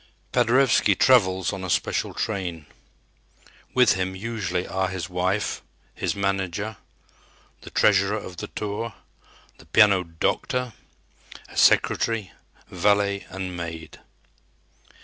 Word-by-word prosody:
Paderewski 125 -4 +3
travels 95 -7 +3
on 95 -1 -6
a 95 - -4
special - - -1
train. 90 -7 -3 1.1
With 125 0 +5
him 95 0 -2
usually 95 -4 -3
are 95 0 -1
his 95 0 -5
wife, 95 +3 -1 0.3
his - - -2
manager, 100 +1 -2 0.8
the - - -10
treasurer 100 0 +3
of 95 -4 -8
the - - -5
tour, 105 +1 -5 0.6
the - - -17
piano 100 -3 +5
"doctor," 120 +9 -2 0.8
a - - -14
secretary, 115 -5 +3 0.4
valet 100 +1 +1
and 95 -1 -5
maid. 80 -2 -7
95 Hz, 110 wpm, -24 LUFS, 90-105 Hz, 1.1 s, With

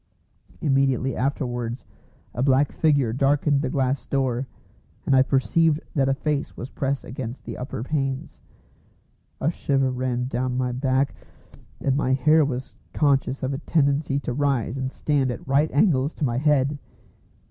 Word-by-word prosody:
Immediately 135 -3 +1
afterwards 125 -3 -2 0.5
a 120 - -3
black 135 +1 +3
figure 140 -8 +2
darkened 140 +2 +2
the 135 - -1
glass 130 0 0
door, 130 -2 0 0.6
and 135 - +3
I 130 - +7
perceived 150 +4 +2
that 135 -2 +2
a 135 - +2
face 150 0 -2
was 125 - -7
pressed 140 0 -2
against 125 0 -6
the - - -6
upper 125 -2 -5
panes. 135 -2 -3 1.0
A 155 - +1
shiver 135 -5 0
ran 125 -1 -1
down 125 0 -2
my 125 -1 0
back, 130 +2 0 0.7
and 135 -1 +1
my 130 -2 +1
hair 155 +4 +4
was 135 -1 -3 0.2
conscious 140 -3 +1
of 130 +1 -1
a 135 - -3
tendency 145 -2 +1
to 125 - -3
rise 135 -3 0
and 130 -1 -3
stand 140 -3 0
at 125 - -6
right 140 +3 +3
angles 145 -3 +2
to 150 - -1
my 120 -1 0
head. 145 -1 +2
135 Hz, 155 wpm, -24 LUFS, 130-145 Hz, 1.0 s, I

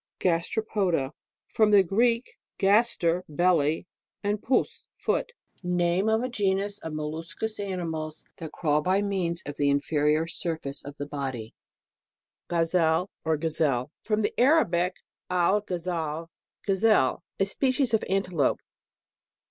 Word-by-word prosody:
GASTEROPODA. 180 -4 0 0.4
From 215 -1 +3
t'ie 200 -2 +7
Greek, 230 +6 +1 0.2
v/s 210 +4 +4
ter, 170 +1 +1
belly, 160 -1 +2 0.4
and 205 0 0
pous, 250 +1 0
foot. 485 - -1 0.3
Name 180 +2 +1
of 220 +2 +2
a - - 0
genus 200 -3 0
of 160 - -6
molluscous 160 +8 -4
animals 165 -6 -4
that 160 -2 -7
crawl 150 -2 +1
by 190 +5 +2
means 180 -4 -1
of 145 0 -6
the 145 -1 +2
inferior 150 +2 +2
sur 165 -1 -3
face 140 -2 -5
of 140 0 -8
the 145 - -4
body. 135 -6 -5 0.9
GAZELLE, 165 +1 +2
or 160 -1 +1
GAZEL 150 -4 0
From 215 -1 0
the 205 - 0
Arabic, 185 - +3 0.3
alghazal, 175 -4 -1 0.3
gazelle. 195 - +3 0.2
A 195 - +3
species 255 +4 +1
of 220 - +3
an 195 +1 +2
telope. 165 -8 +1
175 Hz, 130 wpm, -27 LUFS, 155-205 Hz, 0.9 s, t'ie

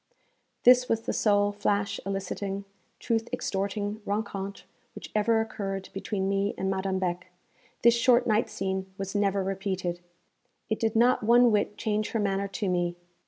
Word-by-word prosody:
This 250 0 +6
was 225 0 +1
the - - -3
sole 205 -1 +3
flash 205 0 -1
eliciting, 195 0 -3 0.3
truth 225 0 -1
extorting 205 +2 -2
rencontre 200 -1 -4 0.3
which - - -9
ever 220 +1 +3
occurred 195 -3 -4
between 195 0 -2
me 200 +1 0
and 190 0 -1
Madame 190 0 -1
Beck; 185 -1 -2 0.6
this 235 0 +7
short 240 +1 +4
night 220 -1 +2
scene 190 0 -3
was 195 0 -4
never 200 -1 +1
repeated. 190 -2 -2 0.7
It 220 - 0
did 225 -1 0
not 245 +3 +4
one 240 +2 +5
whit 210 0 0
change 215 -1 -1
her 225 - +1
manner 200 -1 0
to 200 +1 -3
me. 175 -1 0
200 Hz, 155 wpm, -28 LUFS, 195-220 Hz, 0.7 s, this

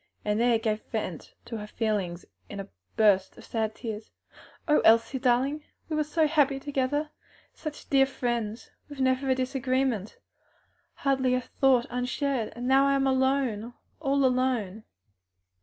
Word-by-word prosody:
and 210 +1 +1
there 235 -1 +4
gave 220 -1 -1
vent 185 -8 -5
to 230 - -5
her 210 0 -7
feelings 205 -6 -2 0.2
in 200 - -7
a 195 - -6 0.3
burst 200 -3 +3
of 220 -2 -3
tears. 220 -2 -6 0.6
"O 300 - +5
Elsie, 230 +4 +4
darling! 265 +4 +1 0.3
we 310 - -1
were 305 - +2
so 310 +2 +1
happy 290 -3 +2
together! 285 +2 -1 0.4
such 305 -2 -8
dear 270 -1 +4
friends! 235 -4 -3 0.2
with 290 -2 -10
never 260 +1 +1
a 260 - +4
disagreement, 255 -4 -1 0.8
hardly 265 -2 +1
a 255 - 0
thought 255 -1 +2
unshared! 250 -1 -1
And 245 +1 -4
now 270 +1 +5
I 275 - +3
am 275 0 +1
alone! 260 -4 +1 0.2
all 280 -2 +2
alone!" 250 -5 0
255 Hz, 145 wpm, -27 LUFS, 220-275 Hz, 0.8 s, O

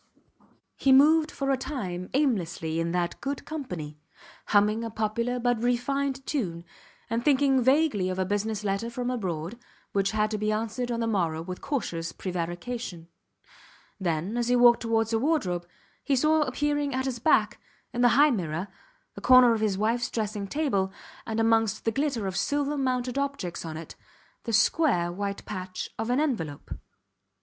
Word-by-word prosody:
He 270 - +3
moved 305 +4 +6
for 275 -2 -2
a 270 - +2
time 195 -10 -5
aimlessly 175 - 0
in 165 0 -1
that 175 -1 -2
good 275 0 -4
company, 175 - -6 0.5
humming 210 +2 +3
a 230 - -3
popular 225 +3 -1
but 245 -2 0
refined 270 +3 0
tune, 175 - -2 0.4
and 230 +1 -1
thinking 270 -2 +3
vaguely 260 -7 +3
of 185 - -3
a 190 - 0
business 205 +2 -2
letter 200 +3 -1
from 245 +1 -3
abroad, 185 -2 -4 0.3
which 195 -1 +1
had 215 +1 0
to 215 - -2
be 215 0 0
answered 225 +3 -2
on 235 0 -1
the - - +1
morrow 170 -7 0
with 180 +1 -7
cautious 170 - -3
prevarication. 175 +1 -5 0.9
Then, 175 +4 -1
as 240 -1 0
he 245 - +3
walked 240 -1 +6
towards 225 0 0
a 225 - +3
wardrobe, 195 - 0 0.4
he 280 - +1
saw 310 +4 +3
appearing 290 0 0
at 260 0 -1
his 255 -3 -3
back, 225 -5 +2 0.3
in 245 - -1
the 245 - +6
high 295 +1 +6
mirror, 180 -3 -2 0.4
the - - -10
corner 255 -2 +7
of 220 - -2
his 205 -3 +1
wifes 230 +4 0
dressing 210 -2 -3
table, 200 -8 0 0.4
and 225 0 -2
amongst 225 -2 +2
the 225 - +2
glitter 270 -4 -1
of 190 -1 -3
silver 285 +8 0
mounted 255 -1 -1
objects 280 -11 -3
on 160 -2 -6
it, 165 - -8 0.5
the 230 - -3
square 215 - +3
white 200 +2 -4
patch 185 -2 -5
of 225 +1 -2
an 250 +3 +2
envelope. 175 - -2
225 Hz, 170 wpm, -27 LUFS, 190-260 Hz, 0.9 s, corner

